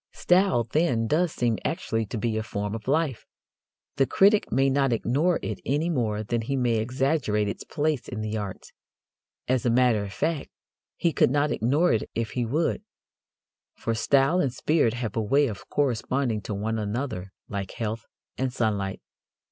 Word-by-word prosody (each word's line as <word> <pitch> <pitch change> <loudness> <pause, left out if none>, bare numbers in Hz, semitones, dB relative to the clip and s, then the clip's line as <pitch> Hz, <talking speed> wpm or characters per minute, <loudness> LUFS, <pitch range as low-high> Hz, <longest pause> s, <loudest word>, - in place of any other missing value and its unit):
Style, 180 -9 +3
then, 120 -1 +1
does 165 +8 +1
seem 120 -5 0
actually 115 - -1
to 115 - -4
be 110 +1 -1
a 110 - 0
form 105 -1 -4
of 110 0 -6
life. 145 -3 0 0.7
The 135 - +3
critic 205 - +4
may 135 +2 +3
not 135 -1 +2
ignore 140 +10 +1
it 110 - -4
any 150 +6 0
more 110 -7 -1
than 115 +2 -1
he 135 +5 -2
may 120 -3 +1
exaggerate 125 -2 0
its 100 - -4
place 150 -3 -1
in 115 -4 -5
the 110 0 -3
arts. 100 -3 -6 0.7
As 130 -2 +1
a 120 - +2
matter 120 -2 +3
of 100 - -6
fact, 160 +6 -2 0.5
he 170 -2 0
could - - +4
not 145 +2 +1
ignore 140 +9 +2
it 110 - -1
if 115 -1 -2
he 120 -2 -1
would, 160 - 0 0.9
for 115 - -2
style 135 +9 +3
and 140 -7 +1
spirit 135 -3 +1
have 115 -4 -4
a 115 - +1
way 140 +7 +3
of 110 -7 -6
corresponding 130 -3 0
to 105 - -5
one 110 +2 -2
another 105 -3 -3 0.2
like 100 -2 -4
health 110 0 -4 0.3
and 130 -1 0
sunlight. 105 -5 -1
120 Hz, 175 wpm, -26 LUFS, 110-140 Hz, 0.9 s, critic